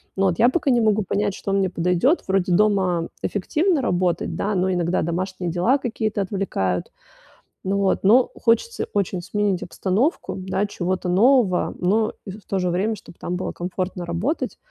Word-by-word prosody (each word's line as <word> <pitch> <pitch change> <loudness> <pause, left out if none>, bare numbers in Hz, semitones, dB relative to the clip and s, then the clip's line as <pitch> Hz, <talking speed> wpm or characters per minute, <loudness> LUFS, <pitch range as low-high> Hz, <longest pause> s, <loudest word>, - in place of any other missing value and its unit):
Но 195 0 +2
вот 180 +1 -1
я 240 - +6
пока 275 -1 +1
не 240 - +3
могу 215 -1 +2
понять, 200 +1 -1
что 195 - -4
мне 195 -1 +2
подойдёт. 180 - +1
Вроде 190 -2 +1
дома 190 -4 +2
эффективно 305 - 0
работать, 180 -5 0
да, 205 0 -1
но 185 +1 +1
иногда 175 0 0
домашние 180 +1 -3
дела 180 +11 +2
какие-то 220 -4 -2
отвлекают. 180 - -2 0.7
Но 195 +1 0
вот, 195 -1 +1
но 235 +6 +5
хочется 355 - +1
очень 195 -3 -1
сменить 200 0 -1
обстановку, 200 - -1
да, 190 +2 -2
чего-то 185 -2 -2
нового, 210 -1 +3
но 215 +5 +1
и 195 - -6
в 205 +2 -11
то 195 - -1
же 180 -1 0
время, 200 +6 0
чтоб 190 - -14
там 180 - -3
было 185 - -3
комфортно 180 +1 -4
работать. 180 - -2
195 Hz, 170 wpm, -22 LUFS, 180-215 Hz, 0.7 s, я